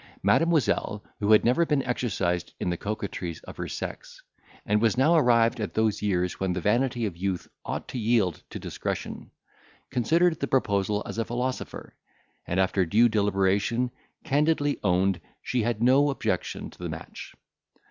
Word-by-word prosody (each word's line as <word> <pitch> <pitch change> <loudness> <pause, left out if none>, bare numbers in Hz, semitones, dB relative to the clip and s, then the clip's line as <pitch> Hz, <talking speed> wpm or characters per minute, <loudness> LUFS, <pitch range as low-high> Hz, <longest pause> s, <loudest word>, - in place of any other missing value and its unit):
Mademoiselle, 155 -10 +2 0.2
who 105 +1 +1
had 110 - +6
never 125 +8 +4
been 150 -4 +1
exercised 95 -9 -1
in 90 - -1
the - - -1
coquetries 95 -4 -4
of - - -11
her - - -4
sex, - - -7 0.4
and 105 +1 +2
was 115 +1 +2
now 145 +6 +4
arrived 115 -6 +4
at 105 - -4
those 110 -2 +1
years 90 -3 0
when 95 -1 0
the 90 - -2
vanity 120 +5 +1
of 100 -5 -3
youth 95 0 -3 0.2
ought - - -4
to 130 - -5
yield 110 -7 +1
to - - -6
discretion, - - -5 0.6
considered 160 +8 +2
the 140 - -1
proposal 105 -5 +1
as - - -5
a - - +2
philosopher, 125 +2 -4 0.5
and 90 - 0
after 95 0 +2
due 110 +8 +4
deliberation 105 +3 +1 0.3
candidly 145 0 +1
owned 95 -1 +2 0.2
she 125 - 0
had 115 0 -1
no 135 +4 +5
objection 135 - -2
to - - -19
the - - -4
match. - - -8
110 Hz, 160 wpm, -27 LUFS, 95-125 Hz, 0.6 s, had